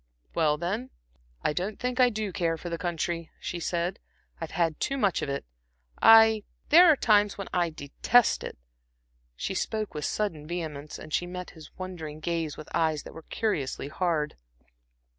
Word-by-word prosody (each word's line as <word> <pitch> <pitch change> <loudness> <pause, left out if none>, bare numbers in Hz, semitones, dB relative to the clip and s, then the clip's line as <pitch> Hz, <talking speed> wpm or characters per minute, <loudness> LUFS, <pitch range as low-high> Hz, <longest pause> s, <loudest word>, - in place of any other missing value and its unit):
"Well, 155 -3 +2
then, 200 +10 -3 0.5
I - - +1
don't 195 +6 -3
think 250 +1 -2
I 250 -1 +7
do 215 -4 -3
care 165 -2 0
for 175 - -6
the 170 -1 -3
country," 170 -1 -2
she 175 - -4
said. 170 +2 -1 0.4
"I've 165 - -4
had 165 -3 0
too 275 - -1
much 200 -9 +2
of - - -3
it. 140 - -3 0.6
I 225 -1 +8 0.3
there 345 +4 +9
are 320 - +7
times 210 -5 +3
when 195 - -5
I 175 -2 +2
detest 160 - +2
it." - - -6 0.8
She 190 - -3
spoke 215 +2 -2
with 150 -1 -4
sudden 165 -8 -2
vehemence, 155 -4 -5
and 155 - -10
she 175 - +1
met 180 0 -6
his 160 -2 -13
wondering 170 -5 -6
gaze 165 -2 -2
with 155 - -9
eyes 160 -2 +1
that - - -10
were 160 - -9
curiously 155 -8 -2
hard. 155 -3 -1
175 Hz, 175 wpm, -28 LUFS, 155-210 Hz, 0.8 s, there